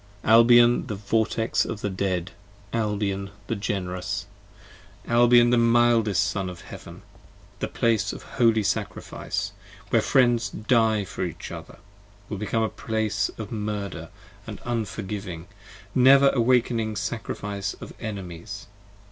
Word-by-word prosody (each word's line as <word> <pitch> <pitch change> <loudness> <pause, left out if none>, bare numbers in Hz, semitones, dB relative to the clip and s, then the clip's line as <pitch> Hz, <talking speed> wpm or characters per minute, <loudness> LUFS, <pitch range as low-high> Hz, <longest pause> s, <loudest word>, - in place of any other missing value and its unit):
Albion 120 +2 +6
the 105 - -3
Vortex 110 +2 0
of 105 - -5
the 105 - -1
Dead! 95 -2 -2 0.4
Albion 105 -3 -1 0.2
the 115 - -2
Generous! 95 -3 -3 0.8
55 - - -9
Albion 120 0 +6
the 120 - +4
mildest 115 -4 +3
son 95 -2 -2
of 90 -1 -9
Heaven! - - -11 0.6
The - - -2
Place 115 -3 +1
of - - -9
Holy 115 -3 +2
Sacrifice! 100 -1 -3 0.4
Where - - +4
Friends 120 -4 +3
Die 110 0 +2
for 95 - -5
each 85 -3 -6
other: - - -9 0.5
will 105 - -4
become 110 +2 0
the 110 - 0
Place 110 -3 -1
Of 110 -2 -7
Murder, 105 -3 -4 0.3
& - - -25
Unforgiving, 105 -6 -5 0.5
Never 135 +2 +7
awaking 120 -3 +1
Sacrifice 100 -2 -4
of - - -10
Enemies. 100 -2 -7
110 Hz, 125 wpm, -25 LUFS, 100-115 Hz, 0.8 s, Never